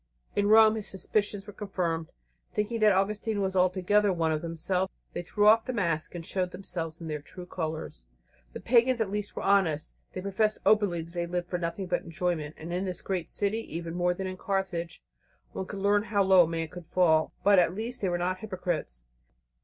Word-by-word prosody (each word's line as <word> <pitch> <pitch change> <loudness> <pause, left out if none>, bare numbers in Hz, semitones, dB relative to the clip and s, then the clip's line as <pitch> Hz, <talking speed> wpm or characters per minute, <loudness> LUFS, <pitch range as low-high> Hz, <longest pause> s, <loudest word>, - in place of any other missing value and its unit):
In 205 0 +2
Rome 220 0 +7
his 210 - -5
suspicions 200 +1 -1
were 205 - -10
confirmed. 175 -6 -2 0.4
Thinking 220 +2 -1
that 215 -1 +6
Augustine 205 +2 0
was 190 -1 -1
altogether 185 +3 +3
one 165 -3 +1
of 155 -1 -1
themselves, 180 +3 -1 0.2
they - - -3
threw 205 +4 +1
off 225 +1 +6
the 255 - -3
mask 170 -7 -1
and 165 -1 -6
showed 185 0 -1
themselves 165 -4 -6
in 165 - -7
their 150 -2 -3
true 180 +4 -10
colours. 160 - -5 0.5
The - - -7
pagans 245 +1 +4
at 215 -4 0
least 210 0 -3
were - - -4
honest. 185 -6 +2 0.2
They 185 - -4
professed 205 +3 0
openly 200 -6 +3
that 170 +1 -14
they 175 -1 -2
lived 175 0 -3
for 180 - -2
nothing 170 +3 -3
but 180 -1 0
enjoyment, 170 -3 -3
and 165 +2 -6
in 185 +2 -1
this 180 -2 -4
great 185 -4 -2
city, 205 +2 0 0.2
even 165 0 -4
more 180 0 +1
than 190 - -4
in 185 0 -5
Carthage, 190 -4 -3 0.5
one 190 - -5
could 200 - -6
learn 205 +2 +2
how 205 -2 +2
low 190 -2 +6
a - - -5
man 165 -1 -3
might 175 -2 -8
fall; 160 -4 +3
but 200 -2 +6
at 175 0 +2
least 235 +4 -4
they 190 - +1
were 175 - 0
not 185 +1 -1
hypocrites. 175 - -3
185 Hz, 210 wpm, -28 LUFS, 170-205 Hz, 0.5 s, Rome